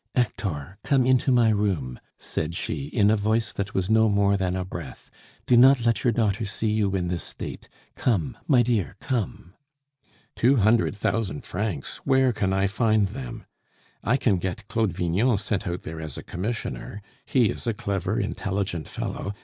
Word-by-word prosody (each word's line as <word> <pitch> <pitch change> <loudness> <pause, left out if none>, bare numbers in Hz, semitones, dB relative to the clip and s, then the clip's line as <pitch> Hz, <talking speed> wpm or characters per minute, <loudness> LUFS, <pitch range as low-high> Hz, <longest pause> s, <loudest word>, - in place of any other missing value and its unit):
"Hector, 100 - -2
come 130 +2 +3
into 130 +1 +3
my 120 -2 +5
room," 95 - 0 0.2
said 80 +2 -3
she, 75 -4 -3
in 100 +6 +3
a - - +4
voice 110 +2 0
that 100 0 -4
was 95 -1 +1
no 110 +1 +4
more 100 0 +3
than 95 -2 -1
a 95 -1 -2
breath. - - -9 0.3
"Do 125 - +4
not 125 0 +6
let 115 -2 +2
your 120 - +4
daughter 110 -2 0
see 105 +2 -1
you 105 -3 +1
in 90 -2 -1
this 85 -1 -2
state! - - -8 0.3
Come, 120 0 0
my 125 -5 +5
dear, 115 -6 0
come!" 105 -7 -3 0.8
"Two 130 +4 +4
hundred 110 -2 +3
thousand 105 -7 -1
francs? 95 -6 -4
Where 130 -2 +2
can 95 -3 0
I 95 +1 +2
find 110 0 +2
them? 120 0 -7 0.6
I 120 +4 +2
can 105 -8 +2
get 95 +3 -4
Claude 110 -4 0
Vignon 100 +8 +1
sent 105 0 -2
out 85 0 -3
there 80 0 -6
as 80 -4 -7
commissioner. 105 +1 -4 0.2
He 120 -6 +3
is - - -7
a 115 - +2
clever, 100 -2 -1
intelligent 95 -5 -2
fellow. 100 +1 -4
105 Hz, 175 wpm, -25 LUFS, 95-115 Hz, 0.8 s, not